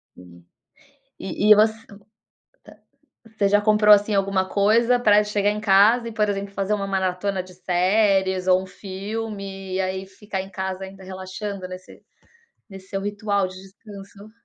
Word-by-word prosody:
Sim. 85 Hz, -1 st, -16 dB, 0.7 s
E 205 Hz, +2 st, -1 dB
e -, -, +11 dB
você 220 Hz, +1 st, +3 dB, 0.2 s
ah. 200 Hz, -, -13 dB, 1.4 s
Você 200 Hz, -, +3 dB
já 205 Hz, 0 st, +4 dB
comprou, 210 Hz, 0 st, +6 dB
assim, 205 Hz, +1 st, 0 dB
alguma 195 Hz, -1 st, 0 dB
coisa 230 Hz, +5 st, +3 dB
pra 210 Hz, -3 st, +4 dB
chegar 205 Hz, -1 st, 0 dB
em 210 Hz, 0 st, -3 dB
casa 215 Hz, +4 st, +4 dB
e, -, -, -8 dB
por 215 Hz, -1 st, +1 dB
exemplo, 200 Hz, 0 st, -4 dB
fazer 195 Hz, +1 st, -2 dB
uma 200 Hz, -1 st, -1 dB
maratona 190 Hz, 0 st, -2 dB
de 185 Hz, 0 st, -15 dB
séries 190 Hz, +1 st, +1 dB
ou 185 Hz, 0 st, +3 dB
um -, -, -9 dB
filme 195 Hz, 0 st, -6 dB
e 190 Hz, -, 0 dB
aí 190 Hz, 0 st, -3 dB
ficar 195 Hz, 0 st, -6 dB
em 190 Hz, +1 st, -8 dB
casa 190 Hz, 0 st, -5 dB
ainda 190 Hz, 0 st, -12 dB
relaxando 190 Hz, +1 st, -7 dB
nesse 185 Hz, 0 st, -12 dB, 0.7 s
nesse 195 Hz, -1 st, -13 dB
seu 195 Hz, -, -3 dB
ritual 205 Hz, -1 st, -1 dB
de 185 Hz, -, -12 dB
descanso? 200 Hz, +1 st, -13 dB
195 Hz, 160 wpm, -22 LUFS, 190-210 Hz, 1.4 s, e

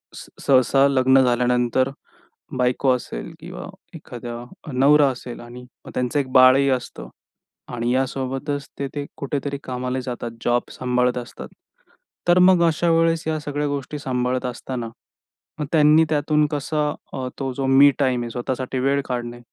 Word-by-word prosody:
स -, -, -10 dB, 0.2 s
सहसा 135 Hz, +1 st, +4 dB
लग्न 130 Hz, -1 st, +4 dB
झाल्यानंतर 125 Hz, +1 st, +1 dB, 0.7 s
बायको 125 Hz, +1 st, +1 dB
असेल 125 Hz, -, -7 dB
किंवा -, -, -8 dB, 0.3 s
एखादा 120 Hz, 0 st, -8 dB, 0.3 s
नवरा 140 Hz, +2 st, +5 dB
असेल 125 Hz, -1 st, -8 dB
आणि 120 Hz, +1 st, -10 dB, 0.2 s
मग -, -, -9 dB
त्यांचं 125 Hz, +3 st, 0 dB
एक 130 Hz, -2 st, -3 dB
बाळही 130 Hz, +1 st, +6 dB
असतं 125 Hz, -1 st, -4 dB, 0.7 s
आणि 120 Hz, 0 st, -1 dB
या 130 Hz, +1 st, +2 dB
सोबतचं 135 Hz, +2 st, -3 dB, 0.2 s
ते 140 Hz, -, -2 dB
ते 145 Hz, -1 st, -3 dB
कुठेतरी 140 Hz, 0 st, -3 dB
कामाला 125 Hz, 0 st, -3 dB
जातात, 120 Hz, -2 st, -5 dB
जॉब 120 Hz, 0 st, +1 dB
सांभाळत 125 Hz, 0 st, 0 dB
असतात. 120 Hz, -, -9 dB, 0.8 s
तर 175 Hz, +1 st, +5 dB
मग 180 Hz, -1 st, +6 dB
अशा 165 Hz, +2 st, +1 dB
वेळेस 165 Hz, 0 st, +2 dB
या 155 Hz, -1 st, -1 dB
सगळ्या 145 Hz, 0 st, -2 dB
गोष्टी 145 Hz, +1 st, -4 dB
सांभाळत 125 Hz, -1 st, -1 dB
असताना 120 Hz, -1 st, -5 dB, 0.7 s
मग 150 Hz, -, -1 dB
त्यांनी 155 Hz, +1 st, +5 dB
त्यातून 150 Hz, 0 st, +2 dB
कसा 150 Hz, +1 st, -1 dB, 0.2 s
अ, 130 Hz, -1 st, -3 dB
तो 135 Hz, -1 st, -2 dB
जो 135 Hz, +1 st, -3 dB
मी 135 Hz, +2 st, +6 dB
टाईम 130 Hz, -3 st, +1 dB
आहे 120 Hz, -, -5 dB
स्वतःसाठी 130 Hz, +1 st, -3 dB
वेळ 140 Hz, +2 st, +1 dB
काढणे. 120 Hz, -1 st, -4 dB
130 Hz, 150 wpm, -22 LUFS, 125-145 Hz, 0.8 s, बाळही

